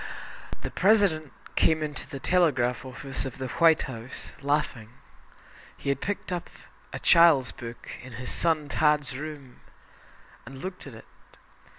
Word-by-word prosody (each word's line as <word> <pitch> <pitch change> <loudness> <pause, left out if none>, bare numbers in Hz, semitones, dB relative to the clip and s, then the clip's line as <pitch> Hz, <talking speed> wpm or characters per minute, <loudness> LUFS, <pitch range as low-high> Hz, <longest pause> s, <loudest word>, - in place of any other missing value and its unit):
The - - -4
President 190 -7 +3 0.2
came 160 -1 +3
into 150 -3 -5
the 135 - -6
telegraph 135 -8 +2
office 135 +1 -4
of 135 -2 -6
the 130 -1 -4
White 165 -2 +6
House, 125 -1 -7
laughing. 140 -6 -1 0.9
He - - -4
had 140 -1 0
picked 200 -1 -3
up 175 -1 -3 0.4
a - - -4
child's 160 -7 +6
book 120 0 -9
in 130 -1 -11
his 125 +2 -5
son 160 -3 +1
"Tad's" 150 -3 +2
room 145 -3 -8 0.8
and 135 - -10
looked 185 +2 -7
at 130 - -9
it. 110 - -12
145 Hz, 145 wpm, -27 LUFS, 130-160 Hz, 0.9 s, White